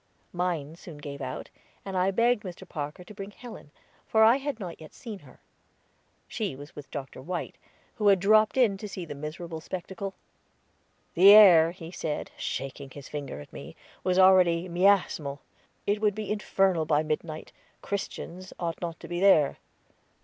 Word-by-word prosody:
Mine 170 -4 -2
soon 170 -2 -11
gave 145 -1 -8
out, 130 -1 -6 0.3
and 195 -1 -5
I 185 +1 +2
begged 230 +3 +2
Mr. 185 -2 -9
Parker 150 +2 -6
to 195 - -12
bring 195 0 -7
Helen, 220 -5 -11 0.4
for 220 0 +4
I 230 +4 +6
had 280 -3 -4
not 175 -5 -7
yet 155 - -12
seen 220 -5 -8
her. - - -18 0.9
She 210 - -3
was 145 +3 -12
with 145 - -10
Dr. 135 -3 -7
White, 175 +6 -5 0.4
who 210 -3 +1
had 195 -2 +6
dropped 215 +5 +4
in 225 -7 +4
to 210 - -7
see 185 -2 -6
the 150 - -7
miserable 160 +3 -7
spectacle. 190 +3 -6 1.0
The 185 +4 +7
air, 180 -7 +9
he 170 -1 -9
said, 155 -4 -4
shaking 135 +1 -5
his 140 0 -11
finger 145 - -6
at 75 - -14
me, - - -9 0.3
was 185 0 +1
already 185 -2 +5
miasmal; 175 -6 +2 0.5
it 205 +1 0
would 210 -2 +2
be 215 -1 -4
infernal 195 -5 +1
by 150 0 +2
midnight 155 0 -4 0.3
Christians 185 -2 -5
ought 170 -2 -3
not 170 -2 -4
to - - -9
be 175 0 -3
there. 180 -7 +4
180 Hz, 170 wpm, -28 LUFS, 155-200 Hz, 1.0 s, air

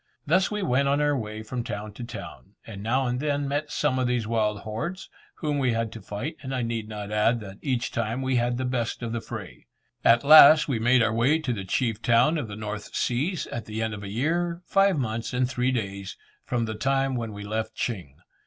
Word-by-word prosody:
Thus 185 +5 +3
we 210 -1 -2
went 140 -2 +2
on 140 +1 +2
our 145 0 +2
way 110 -3 -5
from 120 +2 -4
town 105 -1 -5
to 120 - -8
town, 115 -3 -9
and 100 -3 -8
now 130 +5 +1
and 125 0 -1
then 145 -1 -1
met 145 +2 -2
some 145 -3 +1
of 125 - +1
these 120 -2 0
wild 105 -2 0
hordes, 115 - -5 0.2
whom 150 -3 -1
we 130 -3 +2
had 115 -1 -1
to 115 - -9
fight 135 +11 -5
and 130 -1 -4
I 125 - -1
need 115 -2 -3
not 105 -1 -6
add 105 +3 +2
that 95 -1 -10
each 125 -4 -1
time 115 +3 -2
we 130 -1 +1
had 120 0 +1
the 130 - -2
best 125 -1 -2
of 115 - -3
the 115 0 -2
fray. - - -9 0.4
At 120 +2 +5
last 155 +1 +9
we 130 -6 0
made 120 +2 +4
our 110 0 +1
way 125 +7 +3
to 155 -6 -2
the 100 -4 -5
chief 115 +3 -1
town 125 +8 +3
of 125 - -4
the 105 - -7
North 105 0 -6
Seas 150 +9 0
at 115 -2 -4
the 110 +1 -3
end 110 -1 -2
of 105 - -6
a 100 - -6
year, 170 - -1
five 195 -3 +3
months 115 -3 -2
and 125 0 +2
three 125 0 0
days, 100 -5 -4 0.3
from 120 -2 -1
the 110 - -4
time 135 +3 0
when 115 -2 -3
we 100 0 -7
left 110 +1 -3
Ching. 90 - -4
120 Hz, 235 wpm, -26 LUFS, 110-135 Hz, 0.4 s, last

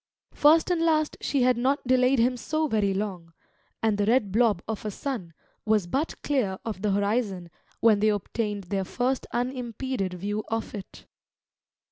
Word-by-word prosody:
First 320 +4 +5
and 345 -2 +1
last 310 -2 +2
she 275 -3 +1
had 250 -1 +3
not 265 +4 0
delayed 255 +1 +3
him 245 +2 +3
so 310 +6 -1
very 210 -6 +1
long, 190 -4 -4 0.5
and 215 -2 +2
the 205 - +1
red 225 -4 +3
blob 215 -4 +2
of 220 -2 -4
a 215 - -2
sun 210 -5 -5 0.3
was 215 -3 +2
but 275 - -2
clear 240 -10 0
of 215 -4 -4
the 210 - +1
horizon 200 -3 -1 0.3
when 220 -3 +5
they 215 +1 +3
obtained 205 0 -2
their 195 +2 -2
first 250 +7 -1
unimpeded 245 -4 -3
view 205 +4 -3
of 225 0 -3
it. 200 -2 -9
225 Hz, 165 wpm, -26 LUFS, 200-255 Hz, 0.5 s, First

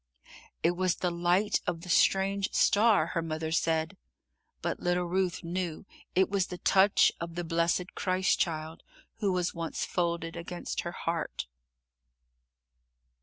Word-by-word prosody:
"It 170 - +4
was 185 0 0
the 180 - -1
light 175 +4 +1
of 165 - -2
the 180 - -10
strange 195 +2 +3
star," 205 -6 +4
her 165 - 0
mother 160 -1 -3
said, 160 -1 0 0.7
but - - -2
little 175 0 +1
Ruth 180 0 -1
knew 175 0 -3 0.3
it 190 +1 +4
was 195 -2 0
the 180 - -6
touch 195 +3 +4
of 170 0 -5
the 175 - -2
blessed 170 +2 0
Christ 185 0 +1
Child, 160 -1 -2 0.4
who 205 -3 +1
was 180 -1 0
once 165 -1 -3
folded 170 -1 -2
against 170 +1 -4
her 175 - -5
heart. 165 - -3
175 Hz, 140 wpm, -29 LUFS, 165-185 Hz, 0.7 s, It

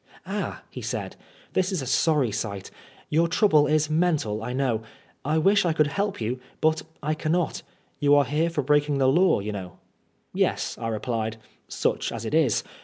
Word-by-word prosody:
"Ah," - - -4
he - - -7
said, - - -4 0.4
"this 185 0 +1
is 185 - -1
a 135 - -4
sorry 140 -2 +2
sight. 100 -2 -4 0.4
Your 165 +2 +3
trouble 165 -4 +4
is 155 +1 +2
mental 155 -10 0
I 120 +2 -4
know. 125 -4 0 0.4
I 150 +3 +1
wish 195 +6 +4
I 170 -2 +1
could 155 -1 +3
help 200 +6 -2
you, 120 +3 -2 0.2
but 160 0 +2 0.2
I 155 +2 +1
cannot. 160 +2 -1 0.4
You 145 -1 +5
are 145 -1 +5
here 150 +6 +1
for 155 -4 -2
breaking 145 +1 +2
the 135 -1 +3
law, 170 - +4
you 105 +2 -4
know."^ 95 -4 -6 0.6
"Yes," - - 0
I 115 - -3
replied, 115 0 -2 0.3
"such - - -1
as 115 - -5
it 110 - -4
is. 155 -9 +3
145 Hz, 180 wpm, -25 LUFS, 115-160 Hz, 0.6 s, You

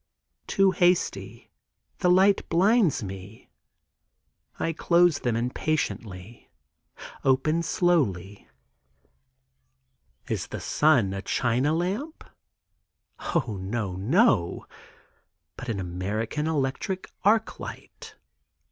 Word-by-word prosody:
Too 195 -1 +3
hasty—the 180 +1 -2
light 190 +2 +4
blinds 190 - +3
me. 95 +2 -9 1.1
I 165 - -1
close 170 -1 +3
them 120 -2 -1
impatiently; 115 -5 -3 0.7
open 140 +5 +2
slowly. 105 - 0 1.8
Is - - -3
the - - -6
sun 130 -11 +2
a 95 - -4
China 125 +7 0
lamp? 205 - -3 1.1
O, 115 - 0
no, 100 -1 -3
no; 105 - +2 0.9
but 125 - -8
an 105 -4 -2
American 105 - -3
electric 160 +6 -2
arc 220 +3 +2
light. - - -10
140 Hz, 85 wpm, -26 LUFS, -, 1.8 s, light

